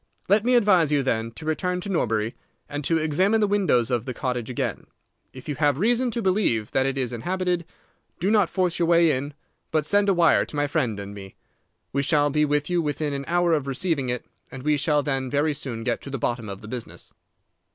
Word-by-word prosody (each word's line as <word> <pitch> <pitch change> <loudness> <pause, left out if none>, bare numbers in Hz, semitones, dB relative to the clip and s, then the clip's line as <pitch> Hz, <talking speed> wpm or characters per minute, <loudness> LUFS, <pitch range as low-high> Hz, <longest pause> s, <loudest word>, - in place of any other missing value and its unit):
Let 205 +2 +4
me 250 +1 +3
advise 190 -9 +4
you, 145 -2 +2
then, 115 -3 -1
to 155 - -9
return 180 +3 -1
to 200 - -6
Norbury, 115 - 0 0.3
and 145 0 -5
to 165 - +2
examine 180 +8 +2
the 210 - +3
windows 185 - +2
of 120 -1 0
the 130 -3 -5
cottage 125 -2 -3
again. 125 - -3 0.4
If 130 - -12
you 150 - -1
have 145 -3 +2
reason 240 - +2
to 235 -1 -2
believe 185 - +1
that 135 0 +2
it 135 0 -2
is 125 -2 -1
inhabited, 180 +6 -1 0.5
do 195 +4 +1
not 205 -5 +3
force 180 -3 0
your 170 - +2
way 170 -1 +5
in, 140 +2 -3 0.3
but 155 -2 0
send 205 +4 +3
a - - +5
wire 170 -2 +4
to - - -9
my 145 0 +1
friend 135 -8 -1
and 100 0 -7
me. 95 -1 -10 0.6
We 140 - +1
shall 145 0 +2
be 150 +1 +2
with 145 0 0
you 175 -1 +1
within 150 -1 -2
an 140 0 -4
hour 175 0 +2
of 145 -3 0
receiving 140 -1 -1
it, 125 -1 -3 0.3
and 130 -1 -8
we 150 0 +2
shall 145 0 +1
then 135 -2 -2
very 145 +3 +1
soon 120 -5 -5
get 120 0 -1
to - - -8
the 135 - -3
bottom 120 -3 -2
of 100 0 -7
the 105 - -10
business." 120 0 -7
145 Hz, 225 wpm, -24 LUFS, 130-175 Hz, 0.6 s, way